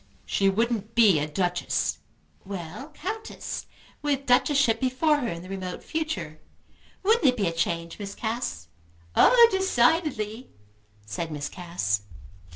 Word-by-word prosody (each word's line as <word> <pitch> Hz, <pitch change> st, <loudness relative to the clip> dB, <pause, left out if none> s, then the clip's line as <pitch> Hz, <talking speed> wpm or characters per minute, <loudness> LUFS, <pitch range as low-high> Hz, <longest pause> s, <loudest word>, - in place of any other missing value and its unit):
"She 195 Hz, -1 st, +2 dB
wouldn't 225 Hz, +1 st, -1 dB
be 210 Hz, -9 st, +6 dB
a 150 Hz, -, -1 dB
Duchess." 175 Hz, +3 st, -1 dB, 0.4 s
"Well, 190 Hz, -, -7 dB
Countess, 440 Hz, +4 st, -5 dB, 0.3 s
with 280 Hz, -2 st, -1 dB
Duchessship 255 Hz, -1 st, +3 dB
before 265 Hz, +4 st, +2 dB
her 265 Hz, -5 st, -2 dB
in 170 Hz, -4 st, -5 dB
the -, -, -10 dB
remote 185 Hz, -2 st, -5 dB
future. 180 Hz, -, -4 dB, 0.6 s
Wouldn't 440 Hz, +2 st, +3 dB
it 250 Hz, -1 st, +3 dB
be 205 Hz, -, +1 dB
a 170 Hz, -, +1 dB
change, 170 Hz, +1 st, -2 dB
Miss 200 Hz, -1 st, -6 dB
Cass?" 220 Hz, -, -3 dB, 0.5 s
"Oh 475 Hz, -1 st, +8 dB
decidedly!" 260 Hz, -, +1 dB, 0.6 s
said 160 Hz, +11 st, -4 dB
Miss 145 Hz, -1 st, -4 dB
Cass. 170 Hz, -, -2 dB
215 Hz, 130 wpm, -26 LUFS, 170-275 Hz, 0.6 s, Oh